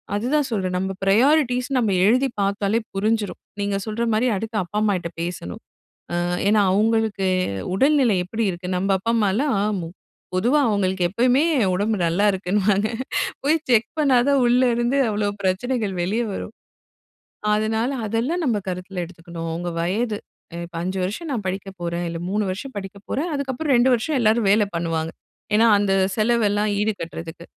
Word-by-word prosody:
அதுதான் 265 +7 +1
சொல்றேன். 185 -4 -1
நம்ம 190 +1 -2
பிரையாரிட்டீஸ் 250 +4 +3
நம்ம 225 -4 +1 0.2
எழுதி 255 +6 +4
பார்த்தாலே 200 +2 +1
புரிஞ்சிரும். 210 +1 -1 0.2
நீங்க 200 0 -1
சொல்ற 220 +2 -2
மாரி, 225 +4 +2
அடுத்து 220 +2 -4
அப்பா 180 +4 -6
அம்மாகிட்ட 190 -5 0
பேசணும். 170 - -5 0.5
அ - - 0 0.3
ஏன்னா 210 0 +4
அவங்களுக்கு 220 -1 +1 0.5
உடல்நிலை 265 -1 +3
எப்படி 225 +5 -2
இருக்கு, 180 +1 -7
நம்ம 195 +2 -1
அப்பா 230 +4 -1
அம்மாலாம் 220 +4 +1 0.2
மு 165 - -5 0.5
பொதுவா 245 +11 +3
அவங்களுக்கு 190 -3 0
எப்பவுமே 250 - +3 0.3
உடம்பு 210 +4 0
நல்லா 170 +5 +2
இருக்குன்னுவாங்க, 200 +2 +1 0.6
போய் 300 +4 +3
செக் 235 -1 +4
பண்ணாதான், 275 -1 +4
உள்ள 245 +2 +4
இருந்து 240 +3 +1
அவ்ளோ 205 0 0
பிரச்சனைகள் 205 +3 -1
வெளியே 215 +7 0
வரும். 210 - -6 1.0
அதனால, 220 +3 0 0.2
அதெல்லாம் 240 - -1
நம்ம 230 -5 +1
கருத்தில் 180 0 -4
எடுத்துக்கணும். 165 -1 -8
உங்க 175 +1 -3
வயது 210 +5 -1 0.5
இப்ப 170 0 -14
5 185 +1 -2
வருஷம, 210 - -4
நா 265 - 0
படிக்க 195 +1 -4
போறேன். 170 0 -2
இல்ல 165 - -5
3 210 +2 0
வருஷம் 210 +8 -6
படிக்க 200 0 -7
போறேன், 320 +6 -1
அதுக்கப்புறம் 280 +1 -1
2 245 +2 +4
வருஷம் 260 +5 0
எல்லாரும் 220 -2 +3
வேல 210 +1 +4
பண்ணுவாங்க. 165 -1 -2 0.4
ஏன்னா 225 +2 +5
அந்த 200 -1 +1 0.3
செலவெல்லாம் 215 -2 +2
ஈடு 215 +1 +1
கட்டுறதுக்கு. 165 0 -7
210 Hz, 150 wpm, -22 LUFS, 190-240 Hz, 1.0 s, ஏன்னா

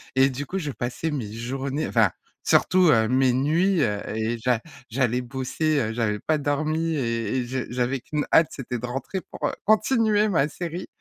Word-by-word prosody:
et 135 +1 +5
du 140 +2 -5
coup, 190 +7 -3
je 150 -4 -4
passais 125 +7 -3
mes 120 -9 -4
journées 135 +5 -3
enfin 110 -6 +3 0.3
surtout, 185 -3 +4
heu, 110 -3 +4
mes 130 +1 +3
nuits, 160 +7 +2
heu, 105 -1 0 0.2
et 115 +2 -1
j'a 120 0 +1 0.3
j'allais 125 0 +1
bosser, 135 +5 -1
heu, 110 -4 -1
j'avais 110 -3 -1
pas 155 -1 0
dormi 155 +3 0
et 115 -2 -1
et 125 - -1
je 130 +1 -3
j'avais 125 +1 -1
qu'une 150 -1 -2
hâte, 160 - +6
c'était 125 -3 -5
de 125 - -5
rentrer 135 +10 -4
pour, - - -4
heu, - - -3
continuer 215 -1 +3
ma 155 -7 +2
série, 175 +3 -5
135 Hz, 190 wpm, -25 LUFS, 120-155 Hz, 0.3 s, hâte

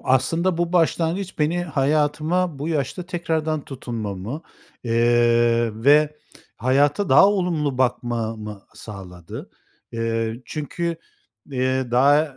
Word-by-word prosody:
aslında 165 +7 +1
bu 175 0 -1
başlangıç 175 +2 0
beni 165 +4 +1
hayatıma 155 +3 0
bu 150 +4 -3
yaşta 155 +3 -2
tekrardan 160 -3 -2
tutunmamı, 115 - -5 0.4
eee, 120 0 +3
ve 150 +1 +5 0.4
hayata 145 +9 +2
daha 135 +8 +7
olumlu 165 -9 0
bakmamı 115 -5 -2
sağladı. 90 -5 -9 0.4
Eee, 115 +1 -2
çünkü, 165 +3 -3 0.5
eee, 130 -1 -1
daha 140 +3 +3
140 Hz, 95 wpm, -22 LUFS, 120-160 Hz, 0.5 s, daha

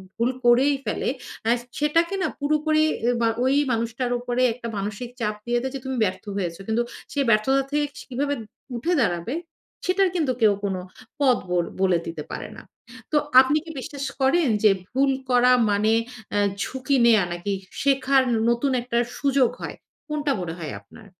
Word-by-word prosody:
ভুল 235 +2 +1 0.2
করেই 260 +4 +5
ফেলে - - -1 0.4
আ - - +3 0.3
সেটাকে 335 +5 +2
না - - +2
পুরোপুরি 305 +1 +2 0.4
বা 230 - +3 0.2
ওই 265 +2 +3 0.2
মানুষটার 230 +2 -1
উপরে 245 +1 -2
একটা 235 -1 -7
মানসিক 210 +5 -4
চাপ 210 -2 -1
দিয়ে 240 0 +1
দেয় 265 +1 -3
যে 270 - -3
তুমি 265 -1 -3
ব্যর্থ 185 -2 -2
হয়েছ। 175 -3 -2
কিন্তু 225 +2 +1 0.3
সে 285 - -2
ব্যর্থতা 250 +6 +3
থেকে 295 0 +1 0.2
কীভাবে 280 +3 -1 0.4
উঠে 285 +10 0
দাঁড়াবে, 175 +3 -1 0.5
সেটার 375 +1 +3
কিন্তু 305 -7 +1
কেউ 210 -2 +6
কোন 195 -2 -1 0.4
পথ 260 -3 +4
বোল 175 -1 +1 0.2
বলে 185 -3 +4
দিতে 160 -3 -5
পারে - - -5
না। - - -9 0.5
তো 305 - +3 0.2
আপনি 275 +4 +2
কি 325 - -7
বিশ্বাস 280 +1 -6 0.2
করেন 280 +3 +3 0.2
যে 210 - +7 0.2
ভুল 270 +1 +2 0.2
করা 250 0 +5 0.2
মানে 210 +2 +2 0.4
আ - - +3 0.2
ঝুঁকি 265 +1 -1
নেয়া 220 -5 +5
নাকি 175 +4 -3 0.3
শেখার 270 -1 +3 0.3
নতুন 235 +4 +1
একটা 235 -1 -2 0.2
সুযোগ 275 -3 +3
হয়? - - -5 0.3
কোনটা 300 -1 -1
মনে 165 -2 -4
হয় 155 -7 -5
আপনার? 200 - -16
250 Hz, 165 wpm, -24 LUFS, 215-280 Hz, 0.5 s, যে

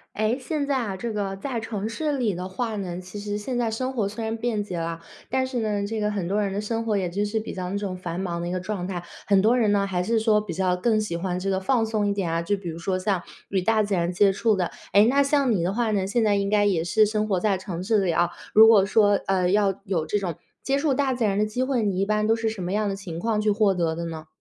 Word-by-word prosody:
哎， 215 +3 +1
现 285 +2 -2
在 280 - +1
啊， 225 -7 -2
这 230 +5 -4
个 200 -3 -2
在 245 +4 -4
城 220 -2 -3
市 290 +5 -2
里 225 -6 0
的 180 +1 -5
话 220 +4 -3
呢， 180 -3 -4
其 185 +3 -9
实 205 0 -3
现 245 +4 -4
在 235 -2 0
生 255 +4 -2
活 220 -5 0
虽 210 +3 -5
然 225 0 -2
便 225 -2 -1
捷 185 -4 -5
了， 165 0 -3 0.3
但 260 0 +1
是 255 -2 -3
呢， 205 -2 -1
这 220 +2 -3
个 210 0 0
很 195 -5 -2
多 205 +2 +1
人 200 -1 -1
的 200 - -2
生 225 +2 -2
活 220 -2 0
也 185 -2 -1
就 200 +4 -1
是 215 +2 -1
比 215 - -6
较 180 -1 -4
那 200 - -1
种 195 -3 -4
繁 180 0 -5
忙 175 -3 -3
的 - - -3
一 175 - -3
个 185 - -2
状 185 -1 -4
态。 180 -2 -4 0.2
很 200 -2 +4
多 225 +5 +4
人 220 -4 +3
呢， 200 -1 +2
还 180 -2 -1
是 225 +3 +1
说 220 -1 +3
比 210 -4 -4
较 180 +1 +1
更 215 +3 +2
喜 210 -5 -3
欢 180 +1 -2
这 195 - -3
个 190 -1 +1
放 225 +4 +1
松 215 -2 0
一 200 - +1
点 195 -4 -2
啊， 165 +1 0
就 205 +5 0
比 185 -3 -7
如 165 0 -5
说 185 +2 -1
像 185 -1 0 0.3
与 190 -2 0
大 220 +3 +3
自 205 -1 -1
然 175 0 0
接 195 +2 +4
触 215 +3 +2
的。 180 -3 -1 0.2
诶， 205 +3 +6
那 275 +4 +4
像 280 -2 +2
你 195 -6 +1
的 180 - 0
话 230 +1 0
呢， 195 -2 +1
现 225 +4 +1
在 210 -2 +3
应 200 0 0
该 205 -1 +3
也 175 -5 +1
是 215 +5 +4
生 215 0 0
活 195 -4 0
在 205 -1 +2
城 185 -2 -5
市 205 0 +2
里 175 - +1
啊， 175 +1 +2 0.2
如 220 +1 +8
果 210 -4 +6
说， 205 0 +4
呃， 185 -2 +2
要 195 -1 +2
有 185 -6 -1
这 205 +6 0
种 180 -4 -3 0.3
接 270 - +1
触 285 0 +1
大 265 0 +1
自 245 -2 -1
然 200 -2 +1
的 210 - +2
机 215 +4 -2
会， 260 -3 0
你 200 -3 0
一 195 - +2
般 210 +1 +1
都 225 +1 +3
是 225 -1 -1
什 215 -4 -6
么 180 +1 -3
样 210 +1 +1
的 - - -2
情 185 -4 -7
况 215 +3 0
去 215 0 +2
获 205 -1 +3
得 170 -3 0
的 170 +1 -4
呢？ 160 -2 -6
205 Hz, 325 characters per minute, -25 LUFS, 185-220 Hz, 0.3 s, 如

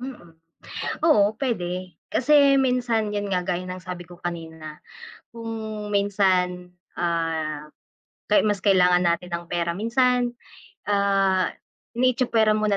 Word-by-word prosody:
Mm. 240 -11 -9 0.7
Oo 210 -7 +4
pwede 180 - -3 0.2
kasi 280 0 +5
minsan 240 -4 +1
yun 205 -1 -3
nga 180 - +1
gaya 180 0 -3
ng 185 0 -7
sabi 180 -1 -7
ko 175 +1 -15
kanina, 160 -3 -6 0.6
kung 220 -2 -6
minsan, 185 -3 +1 0.3
ah, 165 -3 -1 0.8
mas 205 -3 0
kailangan 180 -3 +4
natin 170 +1 0
ng 170 - -9
pera 170 0 -1
minsan, 245 +3 +1 0.5
ah, 195 -2 +2 0.5
itsapwera 240 -3 +2
muna 215 -1 +1
195 Hz, 115 wpm, -24 LUFS, 175-225 Hz, 0.8 s, kasi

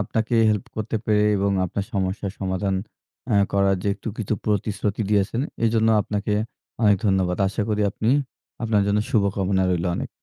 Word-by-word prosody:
আপনাকে 110 +4 -1
উম 115 - +4
হেল্প 105 -2 0
করতে 110 +1 -2
পেরে 105 -1 +3
এবং 100 +1 +1
আপনার 95 +2 -3
সমস্যার 95 +1 -1
সমাধান 95 0 -1 0.5
অ্যাঁ 100 -4 +4
করার 100 -1 +3
যে - - 0
একটু 105 +3 -7
কিছু 110 0 -1
প্রতিশ্রুতি 105 0 -1
দিয়েছেন 105 +3 +1 0.2
এজন্য 115 0 +3
আপনাকে 105 0 -2 0.5
অনেক 105 -2 +5
ধন্যবাদ। 95 -2 +1
আশা 105 +2 -2
করি 105 0 +1
আপনি 110 +4 -1 0.5
আপনার 110 -3 +2
জন্য 100 +1 +2
শুভকামনা 100 -2 +1
রইলো 90 0 0
অনেক। - - -4
100 Hz, 165 wpm, -23 LUFS, 95-110 Hz, 0.5 s, অনেক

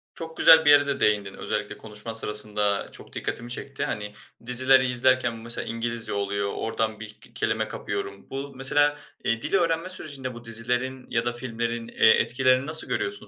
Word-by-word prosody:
çok 160 0 -8
güzel 160 -1 +7
bir - - +6
yere 145 0 +6
de 140 -1 -2
değindin, 100 -2 +1
özellikle 105 0 -4
konuşman 110 +1 -8
sırasında 105 -2 0
çok - - -11
dikkatimi 120 - -5
çekti, 135 +2 -4
hani, 105 0 -4 0.3
dizileri 130 +2 +5
izlerken 125 -1 +2
mesela 115 +1 -2
İngilizce 115 0 -3
oluyor, 100 0 -2
oradan 110 -1 -2
bir 110 -1 -8
k - - -18
kelime - - 0
kapıyorum. 100 0 -6
Bu 140 +1 -5
mesela, 145 +3 +2 0.3
eee, 115 0 0
dil - - -4
öğrenme 165 -1 +1
sürecinde 140 -8 -3
bu 120 0 -12
dizilerin 125 +3 -2
ya 115 0 0
da 120 - -1
filmlerin, 115 -1 -3
eee, 110 - +4
etkilerini 130 +3 +3
nasıl 160 0 +2
görüyorsun, 395 +1 -3
120 Hz, 170 wpm, -25 LUFS, 110-135 Hz, 0.3 s, güzel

